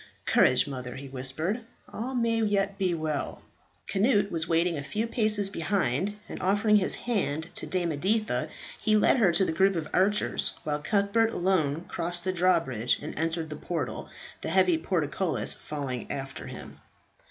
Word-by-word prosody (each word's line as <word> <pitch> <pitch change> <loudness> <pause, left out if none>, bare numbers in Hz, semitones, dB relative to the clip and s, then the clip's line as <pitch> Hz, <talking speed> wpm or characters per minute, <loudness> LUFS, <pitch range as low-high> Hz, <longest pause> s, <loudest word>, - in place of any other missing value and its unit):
"Courage, 125 - +4
mother!" 125 -3 -6
he 140 +1 -8
whispered; 135 - -2 0.3
"all 255 +4 -4
may 230 -2 +1
yet 200 -2 0
be 185 -3 +1
well." 155 -2 -3 0.4
Cnut 205 0 +2
was 165 -1 -2
waiting 170 +1 +2
a 140 - -4
few 215 +10 -2
paces 215 -3 +2
behind, 185 +1 0
and - - -7
offering 205 +3 +4
his 190 - +1
hand 165 -9 -2
to - - -3
Dame 175 -3 0
Editha, 210 +9 0 0.3
he 215 -1 +3
led 210 - +4
her 205 -7 +4
to 175 +3 +2
the - - 0
group 190 +4 +3
of 160 -2 -2
archers, 205 +3 +2
while 150 -1 -2
Cuthbert, 200 +6 +2
alone, 170 -3 +1
crossed 175 0 -1
the 185 +1 -1
drawbridge, 165 -10 +2
and - - -6
entered 165 0 -2
the - - -4
portal, 150 -3 -4 0.3
the - - -3
heavy 185 -2 +4
portcullis 165 0 -1
falling 140 -5 -5
after 135 -1 -5
him. - - -9
175 Hz, 165 wpm, -28 LUFS, 155-205 Hz, 0.4 s, Courage